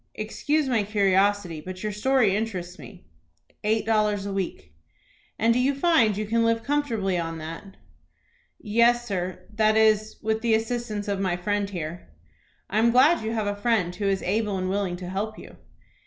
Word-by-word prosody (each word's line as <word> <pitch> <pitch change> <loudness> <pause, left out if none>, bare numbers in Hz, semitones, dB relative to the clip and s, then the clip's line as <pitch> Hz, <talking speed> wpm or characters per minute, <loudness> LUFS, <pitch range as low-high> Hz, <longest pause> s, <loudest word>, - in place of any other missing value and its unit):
Excuse 285 +7 -1
my 240 -4 +2
curiosity, 200 -4 +1
but 185 +3 -8
your 210 - -1
story 215 -1 +2
interests 185 -4 -4
me." 185 - -13 0.6
"Eight 220 +1 +1
dollars 210 -2 +1
a 200 - -4
week." 175 - -4 0.6
"And 230 +1 +3
do 245 - +1
you 270 +2 +2
find 270 - +3
you 215 - -2
can 230 +2 +1
live 230 0 +1
comfortably 230 -11 0
on 165 -1 -4
that?" 165 +5 -9 0.8
"Yes, 235 +3 +2
sir; 185 -4 -4
that 215 0 +3
is, 215 -1 +3
with 220 +1 0
the 230 -1 +3
assistance 225 -2 -3
of 200 -1 -1
my 185 -3 0
friend 205 +2 -1
here." 170 - -6 0.6
"I 210 - 0
am 230 +1 +4
glad 260 +5 +4
you 220 +1 -2
have 220 -2 -1
a 205 0 -1
friend 205 -5 0
who 205 - -4
is 195 -1 0
able 205 +1 0
and 185 0 -2
willing 195 -3 -1
to 180 0 -8
help 205 +4 -3
you." - - -12
210 Hz, 180 wpm, -25 LUFS, 190-225 Hz, 0.8 s, am